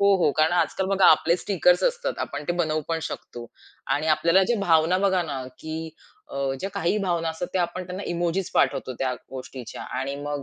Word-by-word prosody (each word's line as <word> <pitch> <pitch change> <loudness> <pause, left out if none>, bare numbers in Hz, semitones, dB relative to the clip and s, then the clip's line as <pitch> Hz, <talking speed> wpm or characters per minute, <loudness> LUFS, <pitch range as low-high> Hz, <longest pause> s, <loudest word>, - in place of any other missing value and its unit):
हो, 200 0 +5
हो, 170 -5 +3
कारण 155 +2 +2
आजकाल 185 +2 +1
बघा 195 -1 +4
आपले 165 +2 +5
स्टिकर्स 180 -1 +2
असतात - - -1
आपण 145 +1 -4
ते - - +3
बनवू 155 -3 0
पण 165 -1 0
शकतो 120 -5 -7 0.5
आणि 150 +2 -1
आपल्याला 165 +5 +4
ज्या 235 +5 +1
भावना 170 -1 +3
बघा 190 -2 +2
ना, 140 -5 -4
की 160 +1 -5 0.4
अ, - - -8 0.2
ज्या 195 - -2
काही 170 +5 +1
भावना 175 -4 0
असतात, 160 +2 -4
त्या 185 - +3
आपण 175 +2 -3
त्यांना 185 +2 -6
इमोजीस 175 +2 -1
पाठवतो 130 - +1
त्या 130 -1 +1 0.2
गोष्टीच्या 130 -1 -8 0.2
आणि 135 +1 -2
मग 145 0 -4
170 Hz, 195 wpm, -25 LUFS, 155-185 Hz, 0.5 s, हो